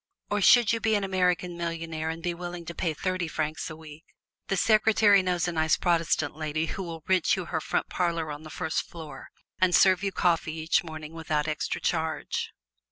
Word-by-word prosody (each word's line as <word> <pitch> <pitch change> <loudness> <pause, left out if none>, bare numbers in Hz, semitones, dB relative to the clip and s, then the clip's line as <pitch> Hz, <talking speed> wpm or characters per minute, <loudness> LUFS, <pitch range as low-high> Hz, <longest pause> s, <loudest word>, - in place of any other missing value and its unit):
Or, 205 0 +1
should 235 +2 +6
you 230 - 0
be 220 -1 +2
an 205 - 0
American 180 -2 0
Millionaire 165 -2 -3
and 165 +1 -5
be 175 - -1
willing 175 0 -7
to 170 - -6
pay 160 -1 -2
thirty 185 +1 -2
francs 155 0 -3
a 155 - -7
week, 155 0 -12 0.4
the 195 - 0
secretary 215 -1 +5
knows 180 -2 0
a - - -1
nice 160 -2 +2
Protestant 165 -3 +1
lady 155 0 -2
who 190 - -5
will 165 -3 -7
rent 185 -1 +3
you 185 -3 -4
her 160 -2 -2
front - - -1
parlor 170 -3 -1
on 145 0 -7
the 155 - -10
first 160 +1 -3
floor 155 -5 -10 0.3
and 185 -1 +4
serve 185 -1 +5
you 200 -1 -1
coffee 170 -3 +1
each 160 +1 +1
morning 155 -1 -8
without 155 -2 -1
extra 155 -1 -2
charge. 160 -2 -2
170 Hz, 200 wpm, -27 LUFS, 160-185 Hz, 0.4 s, should